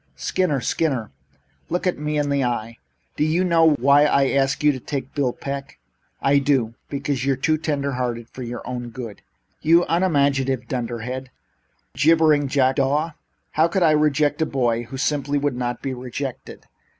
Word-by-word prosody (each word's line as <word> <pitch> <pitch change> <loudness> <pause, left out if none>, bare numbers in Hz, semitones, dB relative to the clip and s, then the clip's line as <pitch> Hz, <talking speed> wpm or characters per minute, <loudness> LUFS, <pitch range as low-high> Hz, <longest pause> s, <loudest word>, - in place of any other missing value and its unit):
"Skinner! 170 -8 0
Skinner! 130 -4 -1 0.6
Look 180 +2 -1
me 150 +1 -2
in 145 -1 0
the 140 -1 +1
eye! 115 -2 -2 0.4
Do - - +2
you 160 +4 +2
know 165 -3 +4
why 140 +3 +5
I 140 -2 +3
asked 135 +1 +1
you 150 - +6
to 130 - -5
take 140 +2 -3
on 130 - -26
Bill 140 -4 +1
Peck?" 140 +2 -6 0.5
"I 140 +1 +4
do. 130 -5 +1 0.2
Because 140 -2 -2
you're 135 0 +2
too 155 +4 0
tender 145 -3 -1
hearted 120 -2 -3
for 130 - -9
your 120 -1 -6
own 120 -1 -4
good." 115 -3 -8 0.4
"You 170 +3 +4
unimaginative 140 -7 +1
dunderhead! 125 +1 -4
You - - -23 0.7
jibbering 155 -2 +4
jackdaw! 135 +3 +1 0.4
How 160 +2 +3
could 180 +2 0
I 160 - +5
reject 150 0 +2
a 160 - +2
boy 120 -4 0
who 130 +3 -8
simply 145 0 0
would 145 -2 0
not 120 -1 -3
be 135 - -2
rejected? 130 +1 -6
140 Hz, 170 wpm, -22 LUFS, 125-150 Hz, 0.7 s, you